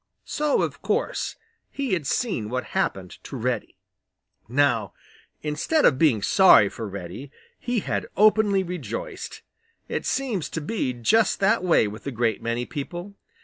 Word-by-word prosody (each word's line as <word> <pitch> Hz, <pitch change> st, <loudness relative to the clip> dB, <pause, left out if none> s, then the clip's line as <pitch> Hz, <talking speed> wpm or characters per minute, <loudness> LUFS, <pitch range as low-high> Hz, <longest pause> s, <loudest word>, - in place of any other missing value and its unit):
So, 300 Hz, -1 st, +1 dB
of -, -, -4 dB
course, -, -, -1 dB, 0.3 s
he 275 Hz, -6 st, -2 dB
had 160 Hz, -7 st, -1 dB
seen 160 Hz, -, -1 dB
what 130 Hz, +2 st, -2 dB
happened 95 Hz, -, -1 dB
to -, -, -8 dB
Reddy. -, -, -2 dB, 0.7 s
Now, 120 Hz, -6 st, +1 dB, 0.5 s
instead 155 Hz, -, +1 dB
of 130 Hz, -, +4 dB
being 125 Hz, -11 st, +3 dB
sorry 185 Hz, -, +6 dB
for 110 Hz, +1 st, -6 dB
Reddy, 100 Hz, +7 st, -7 dB, 0.3 s
he 240 Hz, -3 st, -1 dB
had -, -, -2 dB
openly 210 Hz, -2 st, +4 dB
rejoiced. 180 Hz, -, -6 dB, 0.4 s
It -, -, -3 dB
seems 240 Hz, -, -1 dB
to -, -, -3 dB
be 150 Hz, -, -1 dB
just 200 Hz, -, +2 dB
that 205 Hz, +1 st, +3 dB
way 170 Hz, -11 st, +4 dB
with 105 Hz, +6 st, -8 dB
a -, -, -2 dB
great 115 Hz, -3 st, 0 dB
many 115 Hz, +1 st, -2 dB
people. 175 Hz, +9 st, -6 dB
155 Hz, 145 wpm, -25 LUFS, -, 0.7 s, sorry